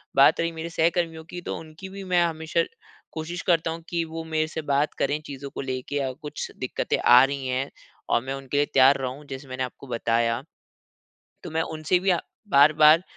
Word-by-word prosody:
बात 140 Hz, +3 st, +6 dB
रही 170 Hz, 0 st, +1 dB
मेरे 165 Hz, 0 st, -6 dB
सहकर्मियों 165 Hz, -1 st, 0 dB
की 175 Hz, +2 st, -7 dB
तो -, -, -4 dB
उनकी 160 Hz, +4 st, -10 dB
भी 195 Hz, +1 st, -8 dB
मैं 180 Hz, -2 st, +2 dB
हमेशा 160 Hz, 0 st, 0 dB, 0.5 s
कोशिश 165 Hz, +2 st, -5 dB
करता 165 Hz, -2 st, +3 dB
हूँ 165 Hz, +1 st, -6 dB
कि 170 Hz, -1 st, 0 dB
वो 165 Hz, 0 st, -6 dB
मेरे 155 Hz, -1 st, 0 dB
से 160 Hz, 0 st, -5 dB
बात 145 Hz, 0 st, +1 dB
करें 145 Hz, +2 st, +1 dB
चीज़ों 140 Hz, 0 st, -7 dB
को -, -, -6 dB
लेके 130 Hz, +1 st, -4 dB
या 135 Hz, -2 st, 0 dB
कुछ 150 Hz, -1 st, -5 dB
दिक्क़तें -, -, -1 dB
आ 125 Hz, +1 st, +7 dB
रही 135 Hz, -1 st, -1 dB
हैं 130 Hz, +2 st, -1 dB, 0.4 s
और -, -, +3 dB
मैं 135 Hz, +1 st, -3 dB
उनके 135 Hz, +1 st, -4 dB
लिए 145 Hz, -, +4 dB
तैयार 135 Hz, +1 st, +6 dB
रहूँ 130 Hz, +3 st, -5 dB
जैसे 135 Hz, +1 st, -7 dB
मैंने 130 Hz, 0 st, -3 dB
आपको 130 Hz, +2 st, -8 dB
बताया। 115 Hz, -1 st, +1 dB, 1.0 s
तो -, -, -6 dB
मैं 160 Hz, +1 st, +1 dB
उनसे 160 Hz, +2 st, 0 dB
भी 190 Hz, +2 st, 0 dB
अ, 175 Hz, -2 st, +3 dB, 0.3 s
बार-बार 155 Hz, 0 st, +6 dB
155 Hz, 200 wpm, -25 LUFS, 135-165 Hz, 1.0 s, आ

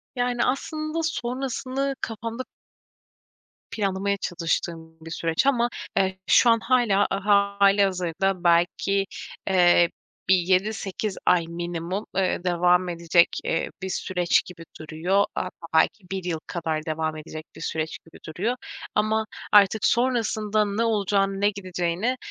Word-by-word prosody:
Yani 245 Hz, -1 st, 0 dB
aslında 310 Hz, +4 st, -2 dB
sonrasını 270 Hz, -1 st, -2 dB
kafamda 230 Hz, +2 st, -4 dB, 1.3 s
planlamaya 200 Hz, -1 st, -1 dB
çalıştığım 165 Hz, -2 st, -3 dB
bir 165 Hz, 0 st, -10 dB
süreç 165 Hz, +8 st, 0 dB
ama, 240 Hz, -3 st, +3 dB, 0.3 s
eee, 190 Hz, -1 st, +1 dB
şu 240 Hz, -, +6 dB
an 230 Hz, 0 st, +5 dB
hâlâ 230 Hz, -5 st, +2 dB
hâlihazırda 195 Hz, -2 st, +2 dB
belki, 175 Hz, +3 st, +2 dB, 0.4 s
eee, 175 Hz, -2 st, +5 dB, 0.4 s
bir 190 Hz, -, +7 dB
7-8 190 Hz, +2 st, -1 dB
ay 170 Hz, -2 st, +4 dB
minimum, 175 Hz, +3 st, -4 dB
eee, 185 Hz, -2 st, 0 dB
devam 180 Hz, 0 st, +2 dB
edecek, 170 Hz, 0 st, +3 dB, 0.2 s
eee, 165 Hz, -, -1 dB
bir 190 Hz, -, -4 dB
süreç 180 Hz, -1 st, +1 dB
gibi 180 Hz, -2 st, -11 dB, 0.2 s
duruyor. 165 Hz, +6 st, 0 dB
Hatta, 185 Hz, -, -2 dB, 0.2 s
belki 175 Hz, +5 st, +2 dB
1 190 Hz, -2 st, -3 dB
yıl 170 Hz, -3 st, -2 dB
kadar 160 Hz, -2 st, -3 dB
devam, 155 Hz, 0 st, -2 dB
edecek 155 Hz, 0 st, -8 dB
bir -, -, -11 dB
süreç 160 Hz, -1 st, -3 dB
gibi 165 Hz, -, -15 dB
duruyor 200 Hz, +10 st, -2 dB, 0.4 s
ama 220 Hz, +1 st, +1 dB, 0.3 s
artık 205 Hz, +1 st, +5 dB
sonrasında 220 Hz, -3 st, +1 dB
ne 205 Hz, +3 st, -1 dB
olacağını 200 Hz, -3 st, +1 dB
ne 205 Hz, -, +4 dB
gideceğini, 185 Hz, +4 st, -2 dB
195 Hz, 125 wpm, -25 LUFS, 170-220 Hz, 1.3 s, bir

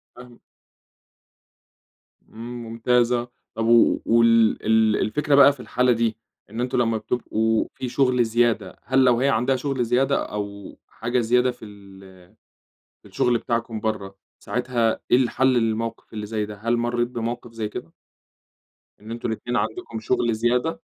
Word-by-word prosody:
فاهمك. 125 Hz, -1 st, -14 dB, 1.9 s
امم، 120 Hz, +2 st, -8 dB
ممتاز 120 Hz, +1 st, +1 dB
آه، 120 Hz, 0 st, -1 dB, 0.2 s
طب 115 Hz, 0 st, -2 dB
و 115 Hz, 0 st, +4 dB
وال 115 Hz, -1 st, +4 dB
ال 110 Hz, 0 st, +3 dB
الفكرة 145 Hz, +6 st, +1 dB
بقى 140 Hz, 0 st, +7 dB
في 140 Hz, -, -19 dB
الحالة 125 Hz, 0 st, +1 dB
دي 115 Hz, -2 st, 0 dB, 0.3 s
إن 110 Hz, +3 st, -5 dB
أنتُم 125 Hz, 0 st, -1 dB
لمّا 115 Hz, -2 st, +1 dB
بتبقوا 110 Hz, -1 st, -1 dB
في 130 Hz, -, -5 dB
شُغل 125 Hz, -2 st, +2 dB
زيادة، 120 Hz, 0 st, 0 dB
هل 130 Hz, 0 st, +3 dB
لو 120 Hz, -2 st, +4 dB
هي 135 Hz, +2 st, +2 dB
عندها 130 Hz, +1 st, +1 dB
شُغل 130 Hz, -1 st, -2 dB
زيادة 135 Hz, +4 st, +2 dB
أو 100 Hz, -1 st, -7 dB
حاجة 120 Hz, +2 st, -2 dB
زيادة 125 Hz, +2 st, +2 dB
في 115 Hz, -, -13 dB
ال 95 Hz, -3 st, -15 dB, 0.8 s
في -, -, -15 dB
الشُغل 120 Hz, -1 st, +1 dB
بتاعكُم 115 Hz, -1 st, -3 dB
برّا، 105 Hz, -3 st, -4 dB, 0.2 s
ساعتها 120 Hz, -2 st, -1 dB
إيه -, -, +7 dB
الحل 130 Hz, +1 st, +1 dB
للموقف 115 Hz, -1 st, -2 dB
اللي 105 Hz, -1 st, -5 dB
زي 105 Hz, 0 st, -2 dB
ده؟ 105 Hz, 0 st, -9 dB
هل 115 Hz, +4 st, -1 dB
مريت 120 Hz, 0 st, 0 dB
بموقف 120 Hz, 0 st, -5 dB
زي 110 Hz, -2 st, -4 dB
كده؟ 80 Hz, -, -8 dB, 1.1 s
إن 110 Hz, +2 st, -10 dB
أنتم 115 Hz, 0 st, -4 dB
الأتنين 120 Hz, +2 st, -4 dB
عندكم 110 Hz, +2 st, -3 dB
شغل 115 Hz, +1 st, 0 dB
زيادة؟ 125 Hz, +9 st, 0 dB
115 Hz, 150 wpm, -23 LUFS, 110-125 Hz, 1.9 s, بقى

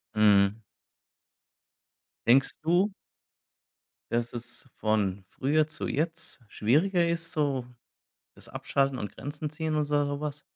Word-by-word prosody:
Mhm. 105 Hz, 0 st, +5 dB, 1.7 s
Denkst 130 Hz, +3 st, +4 dB
du 175 Hz, +6 st, +3 dB, 1.2 s
dass 120 Hz, 0 st, 0 dB
es 120 Hz, +1 st, -8 dB
von 100 Hz, -3 st, 0 dB
früher 150 Hz, +3 st, +1 dB
zu 155 Hz, -, -4 dB
jetzt 160 Hz, -2 st, -1 dB
schwieriger 170 Hz, -, +2 dB
ist, 170 Hz, 0 st, -1 dB
so 140 Hz, -5 st, 0 dB, 0.7 s
das -, -, -10 dB
Abschalten 135 Hz, -2 st, 0 dB
und 105 Hz, -, -4 dB
Grenzen 150 Hz, +1 st, -4 dB
ziehen 155 Hz, +1 st, -3 dB
und 150 Hz, -1 st, +1 dB
sa 145 Hz, 0 st, +2 dB
so 145 Hz, 0 st, -3 dB
was? 150 Hz, -1 st, -4 dB
145 Hz, 120 wpm, -28 LUFS, 120-155 Hz, 1.7 s, Mhm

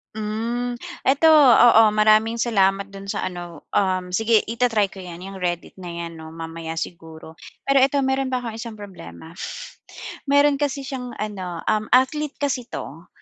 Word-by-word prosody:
Hmm, 230 Hz, +3 st, -3 dB, 0.3 s
ito, 280 Hz, +4 st, +4 dB
oo. 240 Hz, -5 st, +7 dB
Maraming 215 Hz, +2 st, +3 dB
salamat 200 Hz, -4 st, +2 dB
do'n 195 Hz, 0 st, -11 dB
sa -, -, -2 dB
ano, 175 Hz, -3 st, -9 dB
um, 185 Hz, -2 st, +1 dB
sige 225 Hz, +2 st, +3 dB
i-ta-try 225 Hz, -3 st, +1 dB
ko 190 Hz, -1 st, -11 dB
'yan, 175 Hz, -1 st, -9 dB, 0.2 s
Reddit 175 Hz, -2 st, -3 dB
na 180 Hz, -2 st, -8 dB
'yan 170 Hz, 0 st, -6 dB
'no, 160 Hz, 0 st, -10 dB
mamaya 165 Hz, 0 st, -6 dB
siguro. 160 Hz, -2 st, -8 dB, 0.3 s
Pero 275 Hz, -1 st, +4 dB
ito, 280 Hz, +1 st, +2 dB
meron 265 Hz, 0 st, 0 dB
pa 255 Hz, -, 0 dB
akong 230 Hz, -3 st, -6 dB
isang 225 Hz, -1 st, -7 dB
problema. 165 Hz, -, -11 dB, 0.9 s
Meron 285 Hz, 0 st, +5 dB
kasi 285 Hz, -1 st, -1 dB
siyang 255 Hz, -3 st, -6 dB
ano, 185 Hz, -5 st, -5 dB
um, 215 Hz, 0 st, +1 dB
athlete 280 Hz, +3 st, +2 dB
kasi 260 Hz, -4 st, -2 dB
'to, 165 Hz, +5 st, -8 dB
215 Hz, 155 wpm, -22 LUFS, 175-250 Hz, 0.9 s, oo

